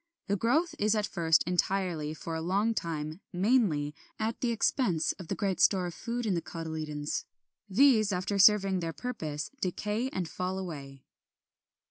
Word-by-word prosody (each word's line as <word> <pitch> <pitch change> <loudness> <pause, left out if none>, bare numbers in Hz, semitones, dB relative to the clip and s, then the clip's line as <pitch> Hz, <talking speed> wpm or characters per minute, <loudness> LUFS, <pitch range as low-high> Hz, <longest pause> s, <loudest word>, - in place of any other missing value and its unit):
The 200 - 0
growth 280 - +1
is 210 +1 +3
at 210 -1 +1
first 165 -5 +2
entirely, 180 -3 0
for 165 - -6
a 160 - -2
long 200 +7 +1
time 160 -2 -4
mainly, 180 - +2 0.2
at 220 +1 -2
the 245 - +1
expense 225 - +1
of 185 - -8
the - - -2
great 195 -4 -1
store 185 -1 +4
of 175 - -4
food 235 +4 -4
in 205 - +1
the 170 - 0
cotyledons. 155 -3 -4 0.4
These, 215 -1 +5
after 195 +2 -1
serving 195 -2 +6
their 165 -1 -3
purpose, 160 -13 -4
decay 210 +7 -1
and 185 -8 -2
fall 185 +3 -3
away. 140 -7 -7
185 Hz, 160 wpm, -30 LUFS, 160-215 Hz, 0.4 s, serving